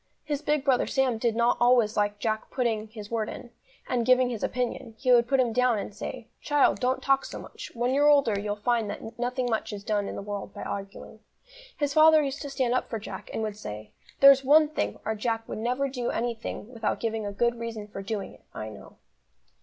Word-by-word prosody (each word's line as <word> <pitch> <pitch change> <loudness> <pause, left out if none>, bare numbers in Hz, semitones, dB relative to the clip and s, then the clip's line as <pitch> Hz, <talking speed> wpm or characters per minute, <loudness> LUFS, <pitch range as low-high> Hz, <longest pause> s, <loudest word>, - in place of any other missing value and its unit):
His 290 -1 -3
big 295 -2 0
brother 265 -3 +3
Sam 260 -4 +1
did 230 -1 +1
not 235 +1 +3
always 240 -3 +4
like 205 0 +1
Jack 215 +1 -2
putting 225 -4 -1
his 215 -1 -10
word 225 -2 -1
in, 240 - -9 0.4
and 245 -2 0
giving 255 +1 +4
his 230 - -4
opinion; 245 -1 -3
he 255 +2 +1
would 240 -1 +5
put 270 +1 +2
him 240 -3 +2
down 250 -1 +3
and 205 - -5
say: 235 +3 -7
"Child, 290 -1 +3
don't 255 +1 0
talk 275 0 +3
so - - -7
much, - - -9
when 245 +2 0
you're 290 +2 +5
older 280 -7 +4
you'll 205 0 -2
find 225 0 0
that 225 +3 -7
nothing 250 +1 -1
much 220 -1 -1
is 205 -1 -7
done 205 -2 -1
in - - -5
the - - -5
world 205 -1 -6
by - - -6
arguing." 195 0 -7 0.6
His 290 -1 0
father 310 0 +7
used 280 +1 -3
to 285 - -5
stand 260 -3 0
up 255 - -1
for 225 - -2
Jack, 215 - -8
and 220 - -3
would 215 -2 -3
say: 105 - -8 0.3
"There's 275 -1 +8
one 300 +3 +6
thing, 310 - -2
our 220 - 0
Jack 225 +1 -2
will - - -5
never 250 +5 0
do 250 -3 -3
anything 235 0 -4
without 225 -2 -2
giving 225 -2 -2
a - - -3
good 235 +3 0
reason 225 -3 -5
for 200 -1 -7
doing 200 0 -4
it, - - -20
I 110 - -5
know." 110 - -13
235 Hz, 225 wpm, -27 LUFS, 215-255 Hz, 0.6 s, There's